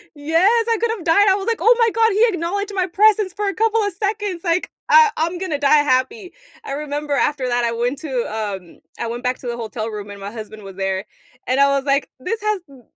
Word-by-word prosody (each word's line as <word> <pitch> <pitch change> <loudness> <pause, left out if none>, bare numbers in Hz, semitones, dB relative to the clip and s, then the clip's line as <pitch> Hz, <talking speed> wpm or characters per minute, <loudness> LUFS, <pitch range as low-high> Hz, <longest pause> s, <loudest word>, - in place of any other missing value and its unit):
Yes, 365 +11 +2
I 455 - +3
could've 450 -6 -1
died, 400 +5 +4
I 380 - +5
was 390 - -5
like, 460 -1 0
"Oh 470 +1 +5
my 460 -1 +4
god, 450 -1 +2
he 440 +4 +4
acknowledged 400 +2 -2
my 370 -1 +1
presence 415 +1 +3
for 415 0 -3
a 390 - -2
couple 450 0 +2
of 405 -2 -1
seconds!" 405 -2 -3
like, 340 0 0 0.2
"Uh, 470 -2 +7
I'm 335 +3 -1
gonna 340 -6 -2
die 290 +1 +4
happy!" 355 - 0 0.3
I - - -5
remember 295 0 -4
after 280 -2 +1
that, 245 -1 0
I 230 - +1
went 240 +4 -2
to, 310 - -7 0.2
um 195 -5 -5 0.2
I - - -3
went 240 +1 -5
back 250 0 -1
to 250 - -11
the 240 0 -3
hotel 225 -1 -5
room 210 -2 -7
and 200 -1 -10
my 200 +2 -7
husband 215 -2 -9
was 195 -1 -9
there, 190 0 -2 0.4
and 260 +2 +1
I 280 - +6
was 275 - -2
like, 275 0 0
"This 390 +12 -3
has 425 -2 0
b 270 -2 -16
320 Hz, 240 wpm, -20 LUFS, 245-410 Hz, 0.4 s, Uh